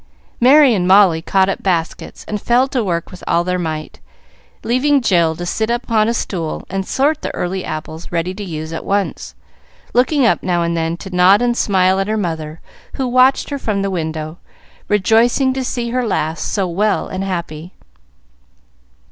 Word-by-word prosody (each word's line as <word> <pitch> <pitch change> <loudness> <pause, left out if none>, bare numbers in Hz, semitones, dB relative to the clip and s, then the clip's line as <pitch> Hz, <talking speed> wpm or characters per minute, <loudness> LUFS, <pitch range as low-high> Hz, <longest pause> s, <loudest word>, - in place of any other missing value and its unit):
Merry 270 +1 +6
and 180 -4 0
Molly 185 -4 +5
caught 190 +2 +2
up 195 - -3
baskets 170 -4 -3
and 210 -1 -4
fell 245 +2 +2
to 255 -4 -1
work 170 -4 -3
with 180 - -12
all 170 - +2
their 180 0 -1
might, 155 -2 -5 0.6
leaving 275 +4 +2
Jill 170 -9 +2
to 175 +2 -6
sit 220 +5 -2
upon 230 -2 +1
a 230 - +1
stool 170 -8 -4
and 195 0 -3
sort 295 +3 +1
the - - -3
early 185 +1 -3
apples 155 +1 -7
ready 175 +1 -1
to 205 +2 -7
use 160 -3 -6
at 165 - -5
once, 165 - -2 0.6
looking 260 +3 +3
up 230 - +2
now 175 -2 0
and 170 0 -1
then 165 0 -2
to 190 0 -8
nod 190 +5 +5
and 240 -1 +1
smile 190 -3 +2
at 195 - -1
her 215 +1 -1
mother 160 -5 -4 0.3
who 265 - -2
watched 255 +3 +3
her 280 - -3
from 205 -5 -2
the 195 - -2
window, 160 -1 -4 0.5
rejoicing 225 +6 +2
to 265 0 -3
see 240 -1 -3
her 250 +1 0
lass 160 -5 -2
so 195 -3 -1
well 200 +5 0
and 185 +1 -4
happy. 170 -2 -5
190 Hz, 180 wpm, -17 LUFS, 170-235 Hz, 0.6 s, Merry